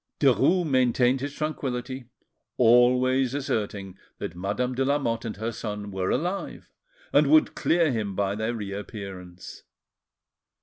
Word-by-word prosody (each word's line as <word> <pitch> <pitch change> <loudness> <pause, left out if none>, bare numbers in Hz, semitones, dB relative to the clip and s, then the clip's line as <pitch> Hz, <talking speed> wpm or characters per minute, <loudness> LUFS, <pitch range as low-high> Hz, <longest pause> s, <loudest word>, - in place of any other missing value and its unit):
Derues 150 +6 +3
maintained 125 -1 +2
his 140 +1 -4
tranquillity, 130 -4 -4 0.5
always 125 +2 +4
asserting 105 -8 -3 0.2
that 85 - -6
Madame 105 +8 -2
de 130 +2 0
Lamotte 130 -5 0
and 110 -3 -5
her 110 +2 -3
son 105 -2 -5
were 95 -1 -2
alive, 180 +8 -3 0.4
and - - +5
would 310 0 +5
clear 165 -3 +2
him 105 -5 -2
by 100 0 0
their 110 +3 -2
reappearance. 100 -4 -7
120 Hz, 125 wpm, -26 LUFS, 105-135 Hz, 0.5 s, and